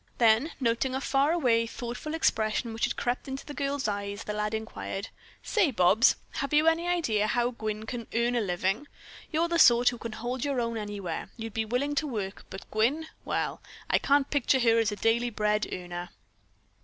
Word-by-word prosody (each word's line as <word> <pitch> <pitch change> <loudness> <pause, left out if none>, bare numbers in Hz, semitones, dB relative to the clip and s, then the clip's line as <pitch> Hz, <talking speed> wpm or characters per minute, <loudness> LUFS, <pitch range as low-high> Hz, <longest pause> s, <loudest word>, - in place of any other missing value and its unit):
Then 235 +6 +4
noting 255 +1 0
a - - 0
far 275 +2 +2
away, 240 -9 +2
thoughtful 245 +7 -5
expression 225 -5 +1
which 225 - +1
had 240 - -2
crept 245 +2 -2
into 270 0 -5
the 295 - -7
girl's 280 -3 -1
eyes, 200 +1 -3
the 210 - -4
lad 210 +1 -1
inquired: 220 -2 -5 0.3
"Say, 410 -8 +2
Bobs, 215 +1 +4 0.2
have 275 -1 -2
you 305 +1 +5
any 330 +1 +3
idea 235 -13 +1
how 240 +2 +1
Gwyn 220 -2 -4
can 235 0 -5
earn 235 +1 +2
a 240 - +2
living? 195 +7 -1 0.4
You're 330 +2 +2
the 340 0 0
sort 240 -3 +7
who 240 -1 -7
can 230 -1 -6
hold 240 +3 -3
your 280 -3 0
own 230 -1 -1
anywhere. 205 -6 -4
You'd 225 -2 -6
be 220 0 -1
willing 250 +6 -1
to 300 +1 0
work, 205 -7 -5
but 195 - -8
Gwyn 270 +9 +1 0.2
well, - - -2 0.3
I - - +4
can't 280 0 +3
picture 275 -2 +2
her 230 -1 +4
as 220 -1 +1
a - - -3
daily 235 +3 +1
bread 210 -1 0
earner." 175 0 -5
235 Hz, 195 wpm, -28 LUFS, 215-275 Hz, 0.4 s, sort